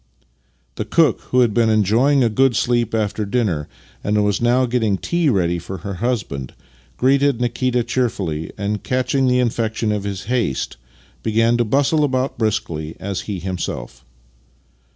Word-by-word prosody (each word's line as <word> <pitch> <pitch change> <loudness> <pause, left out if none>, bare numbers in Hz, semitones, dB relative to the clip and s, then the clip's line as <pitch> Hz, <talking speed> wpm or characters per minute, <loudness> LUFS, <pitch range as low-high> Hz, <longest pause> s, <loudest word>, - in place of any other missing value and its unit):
The - - -2
cook, - - +3
who 125 - +4
had 115 -4 +3
been 115 0 +3
enjojdng 115 +6 +3
a - - +2
good 130 +2 +2
sleep 120 -2 +1
after 105 -1 -1
dinner 100 -9 -1 0.4
and 105 0 +1
was 105 +1 0
now 120 +2 +3
getting 115 -5 +1
tea 170 - 0
ready 85 -6 +1
for 90 +3 -7
her 100 - -3
husband, 100 - -2 0.4
greeted 140 0 +3
Nikita 125 0 0
cheerfully, 110 -11 -2
and, 105 +1 -2
catching 130 +1 0
the 125 0 +3
infection 115 -2 0
of 105 -1 -2
his 100 -2 -4
haste, 115 - -1 0.4
began 115 +2 +2
to 120 - +1
bustle 140 +6 +2
about 130 -1 0
as - - -30
briskly 80 -8 -2
as 100 -1 -3
he 100 - -2
himself. 90 -1 -5
115 Hz, 155 wpm, -20 LUFS, 100-125 Hz, 0.4 s, who